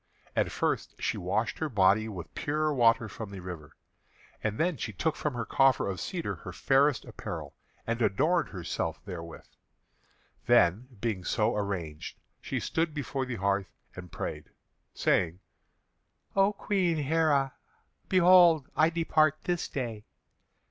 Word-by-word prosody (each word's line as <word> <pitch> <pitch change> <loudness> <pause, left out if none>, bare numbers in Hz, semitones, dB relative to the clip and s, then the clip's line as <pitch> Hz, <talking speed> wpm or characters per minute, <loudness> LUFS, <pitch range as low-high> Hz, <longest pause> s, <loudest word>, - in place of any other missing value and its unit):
And - - +1
first - - -2
she - - -1
washed 100 +6 -1
her 160 - -1
body 105 -1 +3
with 85 -7 -8
pure 150 +1 0
water 115 -3 +4
from 110 0 -7
the 100 -1 -8
river, 85 -5 -9 0.7
and 105 0 -1
then 175 +1 +1
she 125 -3 -4
took 155 - -1
from 150 -4 -3
her 115 -1 -3
coffer 135 -2 +3
of 95 -2 -3
cedar 175 -3 -3
her - - -8
fairest 135 -2 +2
apparel, - - -7 0.3
and 115 +1 -2
adorned 155 - +2
herself 85 -3 -3
therewith. 85 -4 -8 1.0
Then, 95 +9 +4
being 110 -6 -2
so 110 +4 +1
arranged, 90 -7 -4 0.2
she - - -3
stood 160 -1 -1
before 135 -2 -3
the 125 - -3
hearth 100 -1 0 0.2
and 90 -1 -9
prayed, - - -5 0.5
saying: 85 +1 +1 1.0
"O 195 +1 +4
Queen 190 -5 0
Heré, 150 -4 +2 0.6
behold! 175 -5 +6
I 155 +1 +4
depart 155 -2 +2
this 175 -1 -1
day. 115 -6 -5
120 Hz, 140 wpm, -29 LUFS, 100-155 Hz, 1.0 s, behold